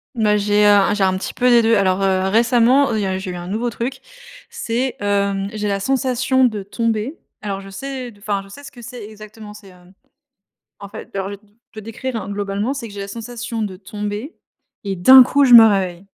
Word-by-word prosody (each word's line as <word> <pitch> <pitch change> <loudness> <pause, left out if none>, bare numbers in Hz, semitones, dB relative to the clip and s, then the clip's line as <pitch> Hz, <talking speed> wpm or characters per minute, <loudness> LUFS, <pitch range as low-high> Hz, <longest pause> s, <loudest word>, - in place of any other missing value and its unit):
Bah 210 -2 +2
j'ai 210 0 +2
un 205 0 +4
j'ai 200 -2 +1
un 185 0 +1
petit - - -6
peu 250 0 +1
des 240 -1 +6
2. 225 0 +3
Alors, 190 0 +1
heu, 190 0 +1
récemment 240 +4 +3
il 215 - -1
y - - -1
a 190 0 -2
j'ai 190 -1 -6
eu - - -7
un 175 0 -7
nouveau 225 +5 -2
truc. 250 +4 -5 0.5
C'est, 260 - -3
hem, 200 -1 -1
j'ai 210 -1 -3
la 195 0 -1
sensation 260 +2 0
de 215 -4 -2
tomber 230 - -3 0.3
alors 195 -2 -4
je 195 - -12
sais 255 +3 -7
d 205 - -21
enfin 200 -1 -2
je 195 - -16
sais 285 +8 -12
ce - - -11
que 240 - -14
c'est 240 -1 -9
exactement 215 0 -12
c'est, 200 -2 -14
hem, 180 +1 -20 0.9
en 200 - -9
fait, - - -11
alors 195 0 -3
je 200 - -6
vais - - -9
t 210 - -29 0.3
te 220 - -12
décrire 230 +3 -6
hein, - - -8
globalement 205 +5 -3
c'est 235 -5 -7
que - - -13
j'ai 200 - -7
la 200 - -6
sensation 230 +1 -6
de 190 -3 -5
tomber, 210 - -6 0.5
et 195 -1 -2
d'un 260 +9 +8
coup 280 +3 +2
je 245 -2 +6
me 225 -1 +11
réveille, 190 -3 0
210 Hz, 235 wpm, -19 LUFS, 195-240 Hz, 0.9 s, me